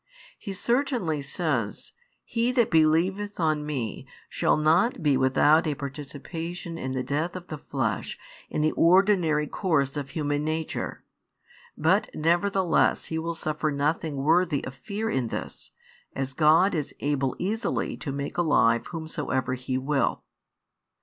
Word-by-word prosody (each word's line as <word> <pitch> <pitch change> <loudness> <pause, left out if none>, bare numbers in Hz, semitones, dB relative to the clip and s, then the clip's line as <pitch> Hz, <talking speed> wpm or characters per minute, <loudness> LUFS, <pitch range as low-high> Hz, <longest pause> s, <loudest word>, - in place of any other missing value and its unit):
He 200 - -6
certainly 235 - 0
says: 135 - -2 0.3
"He 235 +1 0
that 240 -3 +2
helieveth 180 +6 +2
on 155 -3 +1
Me 135 -8 -4 0.2
shall - - +2
not 165 +7 +2
be 145 -3 +4
without 140 +5 +4
a 150 - 0
participation 160 +5 -6
in 130 -5 -4
the 130 -1 -1
death 155 +7 -2
of 180 -1 -8
the 155 - -5
flesh - - -2 0.3
in - - -1
the 155 - +3
ordinary 175 -4 +4
course 145 -6 0
of 140 -2 -4
human 145 0 -1
nature, 155 +1 -3 0.7
but - - +2
nevertheless 175 +3 +2
he 160 - 0
will 165 +1 -3
suffer 155 -1 -1
nothing 150 +1 -1
worthy 155 +2 +2
of 130 - -6
fear 200 - -4
in 130 - 0
this, - - -6 0.5
as 135 -1 -3
God 160 +7 +4
is 150 -4 -3
able 140 -2 0
easily 215 +5 -1
to 145 - -5
make 140 +4 -4
alive 115 -8 +3
whomsoever 130 -6 -2
He 130 0 -2
will." 135 +2 0
155 Hz, 140 wpm, -26 LUFS, 140-175 Hz, 0.7 s, be